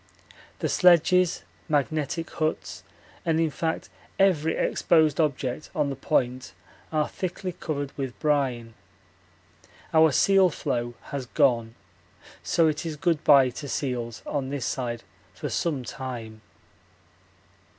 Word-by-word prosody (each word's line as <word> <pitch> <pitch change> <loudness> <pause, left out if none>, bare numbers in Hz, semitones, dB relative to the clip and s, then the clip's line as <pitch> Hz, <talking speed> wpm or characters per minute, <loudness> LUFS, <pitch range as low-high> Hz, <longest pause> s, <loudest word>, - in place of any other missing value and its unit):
The - - -1
sledges, 180 0 +4 0.3
magnetic 155 +2 0
huts, 155 -1 -3 0.4
and 165 -1 +1
in 165 -2 +1
fact 160 +2 -2 0.3
every 160 -5 +3
exposed 160 -2 +2
object 140 -2 -2
on 150 -3 +1
the - - -4
Point 125 -1 -1 0.4
are 155 -1 +1
thickly 185 0 -4
covered 145 -5 -4
with 135 -3 -5
brine. 130 -7 0 1.2
Our 160 -1 +6
seal 195 +5 +4
floe 120 -5 -3 0.2
has 135 -3 -4
gone, 120 -5 +2 0.7
so 165 -1 +2
it 155 +1 -1
is 160 -2 -4
good 165 0 0
bye 140 -3 +6
to 140 +3 -7
seals 120 -5 -3
on 135 -3 -2
this 140 -2 -3
side 120 -3 -3 0.3
for - - -4
some 150 -7 -1
time. 115 -3 -7
145 Hz, 120 wpm, -26 LUFS, 130-160 Hz, 1.2 s, Our